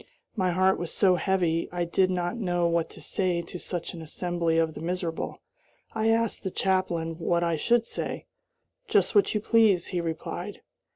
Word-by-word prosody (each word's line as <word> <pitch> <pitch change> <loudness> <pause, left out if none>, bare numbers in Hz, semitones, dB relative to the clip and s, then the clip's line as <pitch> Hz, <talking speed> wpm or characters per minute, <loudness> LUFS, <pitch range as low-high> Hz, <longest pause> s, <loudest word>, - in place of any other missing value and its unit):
My 185 -4 +1
heart 185 +2 +3
was 175 -1 -4
so 190 -3 +4
heavy 175 -2 +1
I 175 0 -1
did 185 +2 +2
not 175 0 -1
know 175 -6 0
what 170 -1 +1
to - - -13
say 180 -3 0
to 175 +1 -8
such 175 -1 -4
an 170 - -8
assembly 170 +1 -1
of 160 -1 +2
the - - -8
miserable. 170 -1 -3 0.5
I 220 0 +1
asked 230 -1 +1
the 190 - -1
chaplain 175 -4 -1
what 170 +1 +1
I 170 -1 +1
should 235 +9 +2
say. - - -4 0.6
"Just - - +2
what 405 - +3
you - - +2
please," 215 -6 +4
he 180 -2 -1
replied. 165 -1 -5
175 Hz, 180 wpm, -27 LUFS, 170-190 Hz, 0.6 s, so